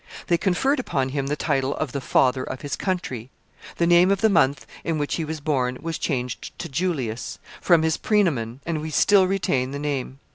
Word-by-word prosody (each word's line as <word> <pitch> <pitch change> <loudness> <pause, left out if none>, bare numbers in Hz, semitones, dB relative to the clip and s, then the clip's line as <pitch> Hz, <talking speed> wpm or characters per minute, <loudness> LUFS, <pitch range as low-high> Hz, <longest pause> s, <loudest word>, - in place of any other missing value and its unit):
They 170 - +2
conferred 210 +10 +1
upon 135 - -1
him 135 0 -2
the 145 - 0
title 135 -1 0
of 155 -5 -3
the 140 - -3
Father 130 0 +2
of 130 - -6
his 145 - -3
Country. 135 - -3 0.5
The 170 - +2
name 175 +2 +5
of 200 -1 +1
the 220 -1 +4
month 135 -6 +2 0.2
in 165 -2 -1
which 145 -1 -1
he 165 - -1
was 155 0 -4
born 130 -4 0
was 165 0 -4
changed 125 -4 -3
to 170 - -5
Julius, 135 -7 -2 0.2
from 170 -3 +4
his 160 0 +1
praenomen, 140 - 0
and 165 -2 -2
we 160 - -4
still 190 +4 +4
retain 140 -9 0
the 140 - -5
name. 140 -2 -3
150 Hz, 205 wpm, -24 LUFS, 130-175 Hz, 0.5 s, name